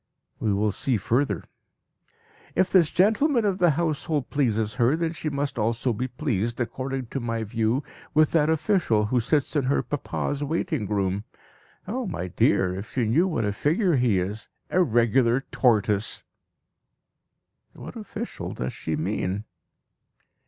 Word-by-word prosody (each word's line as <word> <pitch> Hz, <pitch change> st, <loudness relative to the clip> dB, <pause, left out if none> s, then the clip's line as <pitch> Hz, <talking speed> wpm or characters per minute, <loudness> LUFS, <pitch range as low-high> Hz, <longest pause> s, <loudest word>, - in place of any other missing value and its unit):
We 110 Hz, -, 0 dB
will 105 Hz, +1 st, +1 dB
see 125 Hz, +4 st, +1 dB
further.) 125 Hz, +8 st, 0 dB, 1.1 s
"If 185 Hz, 0 st, +2 dB
this 175 Hz, -5 st, +5 dB
gentleman 225 Hz, -, +3 dB
of 195 Hz, -2 st, 0 dB
the 175 Hz, -, +5 dB
Household 155 Hz, -3 st, -1 dB
pleases 110 Hz, -7 st, +1 dB
her, 120 Hz, +6 st, +4 dB
then 165 Hz, 0 st, -1 dB
she 160 Hz, -1 st, -3 dB
must 140 Hz, -3 st, -2 dB
also 115 Hz, +3 st, 0 dB
be 125 Hz, +4 st, -2 dB
pleased, 120 Hz, -3 st, -2 dB
according 130 Hz, +2 st, -3 dB
to 135 Hz, -, -2 dB
my 115 Hz, -2 st, -2 dB
view, 115 Hz, +4 st, 0 dB, 0.3 s
with 155 Hz, 0 st, +5 dB
that 155 Hz, -2 st, +3 dB
official 160 Hz, -, +2 dB
who 125 Hz, +4 st, +1 dB
sits 145 Hz, +6 st, 0 dB
in 145 Hz, -3 st, +2 dB
her 135 Hz, -, +1 dB
papa's 145 Hz, 0 st, -3 dB
writing 155 Hz, -, -1 dB
room. 100 Hz, 0 st, -1 dB, 0.6 s
Ah, 245 Hz, +5 st, -2 dB
my 90 Hz, -, -4 dB
dear, 90 Hz, +1 st, +2 dB
if 100 Hz, +8 st, -8 dB
you 120 Hz, -, +2 dB
know 150 Hz, -, +3 dB
what 120 Hz, -, -1 dB
a 105 Hz, -, 0 dB
figure 165 Hz, -, +2 dB
he 120 Hz, -6 st, +3 dB
is! 100 Hz, +5 st, -4 dB, 0.2 s
A 185 Hz, -, +3 dB
regular 120 Hz, -, +3 dB
tortoise!" 105 Hz, -4 st, +1 dB, 1.5 s
(What -, -, -10 dB
official -, -, -6 dB
does 65 Hz, 0 st, -3 dB
she -, -, -3 dB
mean?) 95 Hz, +3 st, -2 dB
130 Hz, 150 wpm, -25 LUFS, 110-155 Hz, 1.5 s, this